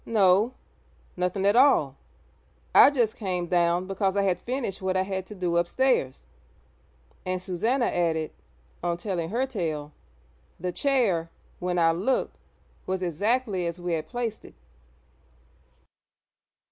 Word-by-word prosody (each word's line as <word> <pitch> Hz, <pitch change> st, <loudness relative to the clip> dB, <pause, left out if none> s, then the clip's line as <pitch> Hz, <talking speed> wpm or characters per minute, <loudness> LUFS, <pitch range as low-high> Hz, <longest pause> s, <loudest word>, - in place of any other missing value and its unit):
'No; 210 Hz, +2 st, +3 dB, 0.6 s
nothing 180 Hz, +2 st, -1 dB
at 200 Hz, +2 st, +4 dB
all. 245 Hz, -, +4 dB, 0.8 s
I -, -, +9 dB
just 240 Hz, -6 st, 0 dB
came 180 Hz, -4 st, -2 dB
down 175 Hz, 0 st, +1 dB
because 195 Hz, 0 st, -1 dB
I 200 Hz, -, +3 dB
had 185 Hz, -3 st, +1 dB
finished 240 Hz, -4 st, -3 dB
what 190 Hz, 0 st, 0 dB
I 185 Hz, -, +2 dB
had 190 Hz, -1 st, -4 dB
to 210 Hz, -, -9 dB
do 175 Hz, -2 st, -1 dB
upstairs!' 175 Hz, -, +1 dB, 1.0 s
And 185 Hz, 0 st, -2 dB
Susannah 225 Hz, +8 st, 0 dB
added, 160 Hz, -3 st, 0 dB, 0.5 s
on 170 Hz, -1 st, -1 dB
telling 175 Hz, -3 st, -3 dB
her 245 Hz, +5 st, 0 dB
tale, 160 Hz, -, -4 dB, 0.7 s
'the 180 Hz, +1 st, -2 dB
chair, 205 Hz, -10 st, +1 dB, 0.3 s
when 180 Hz, 0 st, -2 dB
I 165 Hz, -1 st, +4 dB
looked, 195 Hz, +11 st, -1 dB, 0.5 s
was 185 Hz, 0 st, -2 dB
exactly 200 Hz, -, 0 dB
as 170 Hz, +1 st, -5 dB
we 175 Hz, -1 st, -2 dB
had 155 Hz, -1 st, -2 dB
placed 235 Hz, 0 st, -4 dB
it.' -, -, -14 dB
185 Hz, 135 wpm, -26 LUFS, 175-220 Hz, 1.0 s, I